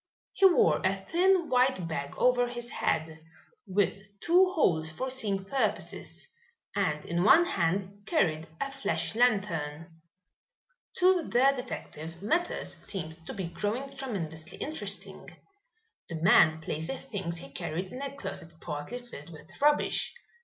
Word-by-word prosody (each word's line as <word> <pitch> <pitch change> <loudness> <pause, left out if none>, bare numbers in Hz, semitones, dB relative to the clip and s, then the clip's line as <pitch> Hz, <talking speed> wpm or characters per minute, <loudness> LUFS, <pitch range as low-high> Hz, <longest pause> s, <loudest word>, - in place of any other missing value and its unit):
He 390 - +7
wore 355 - +4
a 190 +1 +2
thin 345 - +2
white 250 -8 +2
bag 140 -3 -4
over 245 -1 +3
his 240 0 -5
head, 160 0 -1 0.5
with 195 +1 +1 0.2
two 365 - +4
holes 160 - +2
for 255 +12 -3
seeing 205 -7 -1
purposes, 215 -2 -2 0.5
and 155 -7 0
in 170 +1 0
one 325 - +7
hand 195 - -1
carried 160 - +1
a 275 - -2
flash 270 0 -2
lantern. 165 -9 0 0.9
To 365 0 +4
the 265 +3 +5
detective 170 - -7
matters 340 +11 -1
seemed 160 -4 -5
to - - -5
be 190 -2 -3
growing 215 +10 -3
tremendously 165 - -5
interesting. 310 +2 -3 0.8
The 170 - -4
man 160 -1 +5
placed 155 +1 -3
the 270 - -3
things 190 -9 -5
he 140 -4 -8
carried 170 +6 -4
in 255 - -6
a 280 0 -5
closet 165 -11 -6
partly 150 +9 -5
filled 240 -11 -11
with 160 +2 -13
rubbish. 295 +9 +2
195 Hz, 140 wpm, -29 LUFS, 165-265 Hz, 0.9 s, He